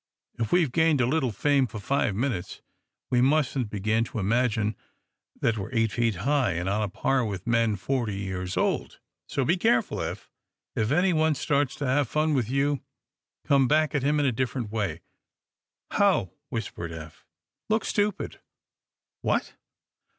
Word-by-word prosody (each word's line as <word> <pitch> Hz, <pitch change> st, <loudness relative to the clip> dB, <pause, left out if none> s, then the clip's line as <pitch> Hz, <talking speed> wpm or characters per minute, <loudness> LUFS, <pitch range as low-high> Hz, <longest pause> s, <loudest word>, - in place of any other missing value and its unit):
If 115 Hz, -2 st, -1 dB
we've 170 Hz, -7 st, +3 dB
gained 160 Hz, -1 st, +3 dB
a 125 Hz, -, +4 dB
little 130 Hz, -1 st, +1 dB
fame 140 Hz, +5 st, +2 dB
for 110 Hz, -, -8 dB
five 110 Hz, -2 st, 0 dB
minutes, 105 Hz, -6 st, -3 dB, 0.5 s
we 125 Hz, -1 st, +4 dB
mustn't 135 Hz, -3 st, +2 dB
begin 110 Hz, +2 st, +1 dB
to -, -, -7 dB
imagine 110 Hz, 0 st, +1 dB, 0.6 s
that 115 Hz, -2 st, +1 dB
we're 95 Hz, -, -5 dB
eight 115 Hz, -2 st, +2 dB
feet 115 Hz, -3 st, +1 dB
high 125 Hz, -, +1 dB
and 85 Hz, +2 st, -2 dB
on 100 Hz, +2 st, +1 dB
a 105 Hz, -, -1 dB
par 130 Hz, +7 st, +1 dB
with 100 Hz, -4 st, -4 dB
men 115 Hz, -2 st, +2 dB
forty 115 Hz, +1 st, -1 dB
years 95 Hz, -2 st, -4 dB
old. -, -, 0 dB, 0.3 s
So 135 Hz, -, -1 dB
be 175 Hz, +7 st, +2 dB
careful, 120 Hz, -8 st, +2 dB
Eph. -, -, -5 dB, 0.4 s
If 110 Hz, -, 0 dB
anyone 160 Hz, -1 st, +3 dB
starts 140 Hz, 0 st, 0 dB
to 145 Hz, -, -4 dB
have 130 Hz, +2 st, +2 dB
any -, -, -18 dB
fun 155 Hz, 0 st, +2 dB
with 125 Hz, -5 st, 0 dB
you, 140 Hz, +1 st, +1 dB, 0.6 s
come 140 Hz, -3 st, +4 dB
back 155 Hz, +2 st, +2 dB
at 145 Hz, -, +1 dB
him 145 Hz, +3 st, +2 dB
a 140 Hz, -3 st, +2 dB
different 120 Hz, -2 st, -2 dB
way." 100 Hz, -7 st, -2 dB, 0.9 s
"How?" 190 Hz, -, +2 dB, 0.2 s
whispered 105 Hz, -8 st, -4 dB
Eph. 80 Hz, -1 st, -10 dB, 0.4 s
"Look 220 Hz, +1 st, +1 dB
stupid." 205 Hz, -1 st, -1 dB, 0.8 s
"What?" -, -, 0 dB
125 Hz, 160 wpm, -27 LUFS, 105-145 Hz, 0.9 s, a